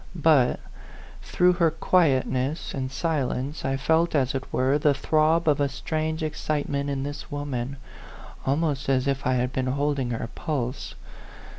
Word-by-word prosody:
But, 150 -6 +3 0.6
through 180 0 +3
her 165 - +6
quietness 150 -3 +1
and 130 -1 -3
si 165 - -2
lence, 130 +3 -3
I 135 0 0
felt, 160 +4 +2
as 135 -3 +2
it 135 -1 -5
were, 135 +3 +2
the 145 -1 +3
throb 155 +3 +2
of 145 -2 +3
a 140 - +2
strange 155 +3 -3
excitement 145 -2 -2
in 135 -1 -2
this 145 +1 -6
woman, 140 -2 -4 0.7
almost 145 0 0
as 130 0 +2
if 135 -1 -1
I 130 - +2
had 125 +1 -1
been 130 0 -1
holding 140 -1 0
her 115 -1 -3
pulse. 140 -6 -3
140 Hz, 155 wpm, -25 LUFS, 130-155 Hz, 0.7 s, her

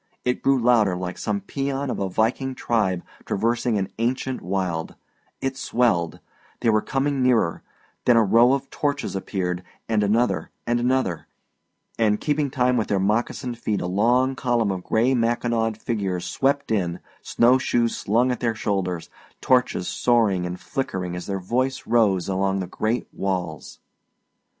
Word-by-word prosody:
It 125 0 0
grew 135 0 +3
louder 115 -6 +3
like 90 0 -5
some 105 -2 -1
pæan 135 +5 -2
of - - -3
a 100 -1 -1
viking 125 +6 0
tribe 100 -8 0 0.2
traversing 115 +1 0
an 95 -1 -1
ancient 130 +2 -1
wild; 90 -3 -2 0.5
it 135 0 -1
swelled 110 -11 +1 0.4
they 115 - +3
were 110 0 +3
coming 135 +2 -1
nearer; 120 -9 +2 0.4
then 120 -2 +5
a 115 - +6
row 115 +5 +5
of 135 0 -1
torches 145 -6 -2
appeared, 90 -2 -2 0.3
and 110 -2 +1
another 110 +4 +1 0.2
and 120 0 +1
another, 120 -9 0 0.7
and 105 -2 +3
keeping 150 -1 0
time 125 -1 +1
with 110 - 0
their 100 - +1
moccasined 115 +4 -1
feet 105 -3 -1
a - - -3
long 120 +8 +2
column 120 -5 +1
of 95 -2 -4
gray 120 +4 +2
mackinawed 115 -2 0
figures 100 -6 -2
swept 140 -1 0
in, 90 -5 0 0.2
snow 125 +2 +3
shoes 120 -2 +1
slung 120 +5 +1
at 125 - -2
their 115 -2 0
shoulders, 95 -5 -2 0.3
torches 125 -8 +2
soaring 105 -7 +2
and 90 0 -6
flickering 95 -9 -3
as 90 - -6
their 95 -1 -2
voice 130 +7 -1
rose 105 -6 +2
along 95 0 0
the 95 - -2
great 110 +6 -2
walls. 90 -7 -3
115 Hz, 155 wpm, -24 LUFS, 95-125 Hz, 0.7 s, a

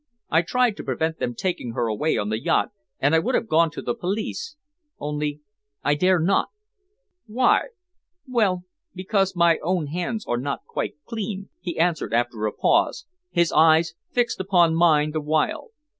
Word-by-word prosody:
I 160 - +5
tried 235 +4 +1
to - - -6
prevent 160 0 -2
them 120 - -2
taking 150 -7 -3
her 120 - 0
away 115 +8 0
on 105 - -1
the 110 +1 -2
yacht, - - +1 0.3
and 140 +3 +2
I 160 - +6
would 250 +10 0
have 225 - 0
gone 165 -1 +3
to - - -8
the 120 - -1
police 210 - -4 0.4
only 150 0 -3 0.4
I 145 - +3
dare 185 +5 +3
not." 180 +5 +2 0.8
"Why?" 245 +4 +3 0.6
"Well, 205 -8 +1 0.3
because 190 0 0
my 170 -1 +4
own 175 -1 0
hands 180 +9 -3
were 120 - -1
not 140 +2 -4
quite - - -4
clean," 200 -3 -5
he 175 -2 -5
answered 165 -7 +1
after 120 -2 0
a - - -2
pause, 485 - +1 0.2
his 170 -2 +2
eyes 160 +1 +4 0.2
fixed 245 -1 0
upon 180 -3 +3
mine 155 -3 +3
the 155 0 -2
while. 155 - 0
165 Hz, 170 wpm, -24 LUFS, 150-190 Hz, 0.8 s, I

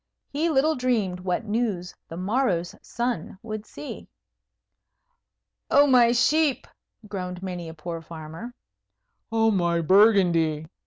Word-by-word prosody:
He 310 +4 0
little 310 +1 +3
dreamed 230 -9 0
what 180 +4 -2
news 210 -5 -2
the 165 - -8
morrow's 185 -3 0
sun 235 -8 -3
would 215 -1 -6
see. 295 - -9 1.6
"Oh, 285 +1 +6
my 250 -4 +5
sheep!" 285 +4 +2 0.4
groaned 180 -2 -5
many 180 -3 -5
a 160 - -10
poor 165 +1 -6
farmer. 165 +9 -9 0.8
"Oh, 225 0 +3
my 170 -4 +1
Burgundy!" 175 -5 +4
200 Hz, 115 wpm, -25 LUFS, 175-245 Hz, 1.6 s, Oh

